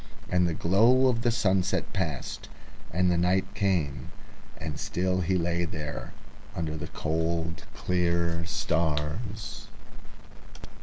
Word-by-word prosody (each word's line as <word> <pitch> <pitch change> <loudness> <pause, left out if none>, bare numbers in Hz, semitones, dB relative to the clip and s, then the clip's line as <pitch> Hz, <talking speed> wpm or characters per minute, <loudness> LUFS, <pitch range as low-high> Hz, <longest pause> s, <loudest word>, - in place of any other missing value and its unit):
The 90 -2 +3
glow 115 +11 +5
of 115 -2 0
the 120 - +3
sunset 95 -6 +1
passed, 80 -8 -3 0.4
and 90 +2 +3
the 85 - +2
night 90 +2 +2
came, 90 -9 0 0.5
and 75 -1 -5
still 90 +1 0
he 90 +2 +2
lay 85 0 0
peacefully 85 -1 -2 0.2
contented - - -9 0.5
under 80 -2 -2
the 80 - -5
cold 80 0 -1
clear 85 -2 +1
stars. 80 +8 -1
85 Hz, 115 wpm, -28 LUFS, 80-95 Hz, 0.5 s, glow